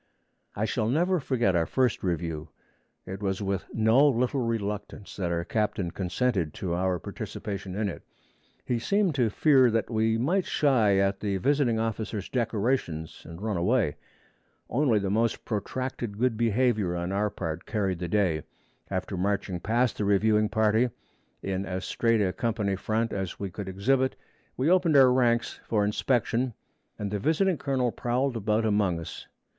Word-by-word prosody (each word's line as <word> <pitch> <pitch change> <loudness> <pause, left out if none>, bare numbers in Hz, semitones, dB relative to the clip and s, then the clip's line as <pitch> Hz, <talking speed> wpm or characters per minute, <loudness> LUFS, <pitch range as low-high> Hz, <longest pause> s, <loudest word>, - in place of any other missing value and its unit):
I 105 - 0
shall 110 -1 -1
never 175 +7 +2
forget 120 -9 +1
our 85 -1 +2
first 130 -4 +1
review. 85 -3 -3 0.6
It 95 +2 -7
was 95 -1 -1
with 100 -2 -2
no 115 +6 +4
little 125 0 +1
reluctance 105 -3 -4
that 90 -3 -1
our 85 0 -1
captain 105 -5 -1
consented 95 - -1
to 90 -3 -3
our 90 +1 0
participation 95 +2 -6
in 105 0 0
it. 95 - -6 0.6
He 120 -2 0
seemed 195 - +1
to 125 -5 +2
fear 130 +2 +4
that 115 +1 -1
we 110 0 +2
might 175 +10 +1
shy 115 -9 +3
at 95 0 +1
the 100 -2 -1
visiting 135 +1 +2
officers' 110 -2 -3
decorations, 110 - -1
and 85 +4 -9
run 110 -4 -1
away. 95 - +1 0.8
Only 125 -3 +3
the 100 -2 -1
most 115 +2 0
protracted 120 0 -3
good 125 0 +1
behavior 110 -4 +1
on 85 +1 -3
our 105 +2 +1
part 80 -2 -5
carried 95 -5 -1
the 90 - -3
day. 85 -5 +1 0.5
After 95 +1 -3
marching 95 -1 -1
past 115 +6 0
the 105 - 0
reviewing 105 +1 +3
party, 110 +2 +2 0.5
in 95 0 -2
as 95 0 -3
straight 115 -2 +1
a 90 -2 0
company 105 -2 -1
front 110 +4 -1
as 95 -3 -4
we 100 -2 -4
could 95 +1 -6
exhibit, 130 +8 +1 0.4
we 130 - +1
opened 175 -4 +4
our 130 -2 +7
ranks 120 -2 +1
for 105 -2 +2
inspection, 120 +2 0 0.4
and 100 -1 -4
the 105 - -1
visiting 160 - +1
colonel 130 -3 0
prowled 125 +3 -1
about 110 0 0
among 100 -5 +1
us. 80 - -8
110 Hz, 160 wpm, -27 LUFS, 95-125 Hz, 0.8 s, our